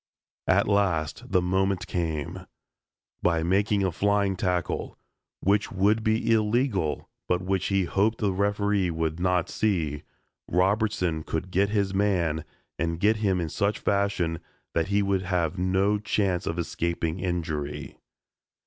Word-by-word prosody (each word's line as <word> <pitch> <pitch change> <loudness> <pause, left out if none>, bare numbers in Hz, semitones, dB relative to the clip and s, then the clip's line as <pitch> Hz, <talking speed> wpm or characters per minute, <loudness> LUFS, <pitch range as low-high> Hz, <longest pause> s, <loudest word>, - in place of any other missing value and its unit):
At - - +3
last 90 -7 0
the 90 - +3
moment 95 +1 +1
came. 85 +2 -3 0.7
By 85 -2 +2
making 100 +3 +2
a 95 - +1
flying 100 +2 +1
tackle, 90 -2 -2 0.4
which 100 +2 +2
would 105 +4 +2
be 110 +1 +1
illegal 110 - +1 0.2
but 90 0 0
which 95 0 0
he 95 -1 +2
hoped 100 +5 +1
the 100 -3 0
referee 100 -1 +1
would 80 0 -2
not 90 -1 +1
see, 80 -9 -1 0.5
Robertson 95 -3 +1
could 80 +3 -4
get 100 +2 +2
his 100 -2 0
man 90 -6 +1 0.3
and 85 +1 -1
get 110 +4 +3
him 100 -4 +1
in 85 -2 -2
such 100 +6 0
fashion 100 -5 0 0.3
that 80 -1 +1
he 100 +1 +2
would 100 -1 +1
have 90 -2 -1
no 95 +3 +2
chance 100 -4 0
of 80 - -2
escaping 85 0 -2
injury. 80 -5 -3
95 Hz, 140 wpm, -26 LUFS, 85-100 Hz, 0.7 s, At